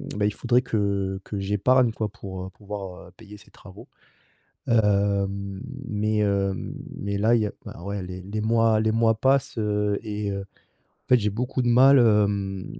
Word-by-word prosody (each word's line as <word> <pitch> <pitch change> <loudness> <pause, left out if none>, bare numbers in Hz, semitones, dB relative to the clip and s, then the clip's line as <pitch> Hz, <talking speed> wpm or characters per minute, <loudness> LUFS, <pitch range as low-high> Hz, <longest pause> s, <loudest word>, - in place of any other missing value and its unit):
bah, 105 0 0
il 105 - -2
faudrait 125 +4 +2
que 100 -5 -1
que 100 - -5
j'épargne, 115 +5 +2
quoi. 110 -1 -3
Pour 95 -3 -8
pouvoir 95 -3 -8
payer 105 0 -13
ces - - -19
travaux, 95 -2 -14 0.8
hem, 100 -3 +1 0.3
mais 110 -2 -1
hem, 100 -2 -1 0.2
mais 100 0 -3
là 110 +3 +4
il 115 - +2
y - - +1
a - - -6
enfin - - -9
ouais 100 +1 -4
les 90 0 -7
les 100 +4 -4
mois 115 0 +3
les 110 0 +1
mois 115 0 +3
passent, 135 0 +1
heu, 105 -1 0
et 105 -2 -3
heu, 100 0 -3
en 100 - -17 0.4
fait 125 - +6
j'ai 105 -1 0
beaucoup 125 +5 -2
de 120 - -1
mal, 130 +3 +6
hem, 100 -4 +2
105 Hz, 180 wpm, -25 LUFS, 100-115 Hz, 0.8 s, fait